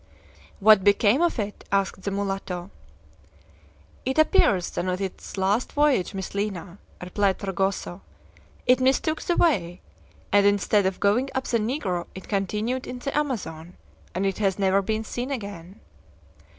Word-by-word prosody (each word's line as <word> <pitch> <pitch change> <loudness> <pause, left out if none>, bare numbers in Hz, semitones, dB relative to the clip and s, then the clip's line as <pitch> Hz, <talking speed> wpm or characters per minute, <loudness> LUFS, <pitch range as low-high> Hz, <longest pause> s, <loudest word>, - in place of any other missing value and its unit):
"What 210 -1 +6
became 205 - +4
of 345 -4 +2
it?" 210 -2 -4
asked 195 -1 0
the 200 - -2
mulatto. 195 -2 -3 1.3
"It 265 +3 -2
appears 210 - +3
that 180 - -3
on 185 0 -1
its 195 0 -6
last 200 +5 0
voyage, 285 - +2
Miss 190 -1 -5
Lina," 200 -2 -4 0.2
replied 190 +2 +1
Fragoso, 195 -1 -2 0.6
"it 250 0 +5
mistook 270 +4 +1
the 345 - -1
way, 185 - +2 0.5
and 205 0 +5
instead 205 0 +3
of 190 - -3
going 235 +7 +2
up 260 - 0
the 235 - +1
Negro 210 - -2
it 190 - -9
continued 210 +5 -1
in 250 - -5
the 275 +3 -4
Amazon, 185 - -3 0.4
and 190 +2 0
it 195 0 -1
has 195 -3 +1
never 195 0 +3
been 220 +2 -2
seen 245 +3 -4
again." 200 -8 -6
200 Hz, 150 wpm, -25 LUFS, 190-245 Hz, 1.3 s, What